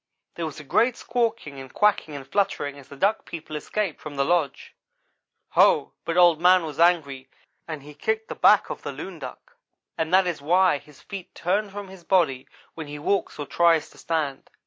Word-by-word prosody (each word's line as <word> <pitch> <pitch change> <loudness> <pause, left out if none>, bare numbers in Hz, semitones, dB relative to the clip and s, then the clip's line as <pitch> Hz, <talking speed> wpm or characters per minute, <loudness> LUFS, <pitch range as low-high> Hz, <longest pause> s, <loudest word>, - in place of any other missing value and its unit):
There 165 -1 -3
was 155 - -8
a - - -9
great 235 - +2
squawking 230 - -2
and 130 -1 -10
quacking 205 -7 +1
and 135 -2 -8
fluttering 145 -5 -1
as 135 - -15
the 140 - -11
Duck 200 +9 +1
people 155 -2 -8
escaped 185 +3 -3
from 150 -2 -8
the 140 0 +1
lodge. 160 -4 0 0.8
Ho! - - +4
but 165 +1 -2
Old 175 -3 +6
man 180 0 +6
was 155 -2 -7
angry, 140 -7 +2 0.4
and 155 -4 -6
he 150 +1 -11
kicked 220 +9 -2
the - - -5
back - - +4
of - - -6
the - - -5
loon - - -8
duck, - - -10 0.4
and 160 0 -1
that 190 +1 +5
is 175 -5 -3
why 175 +1 +3
his 150 -2 -19
feet 195 -3 -9
turn 200 +4 0
from 200 0 -7
his 190 -2 -13
body 165 -9 +1 0.3
when 160 -2 -7
he 145 0 -7
walks 195 +7 -1
or 145 - -4
tries 165 0 +2
to - - -18
stand. 155 -5 -2
165 Hz, 200 wpm, -25 LUFS, 145-190 Hz, 0.8 s, Old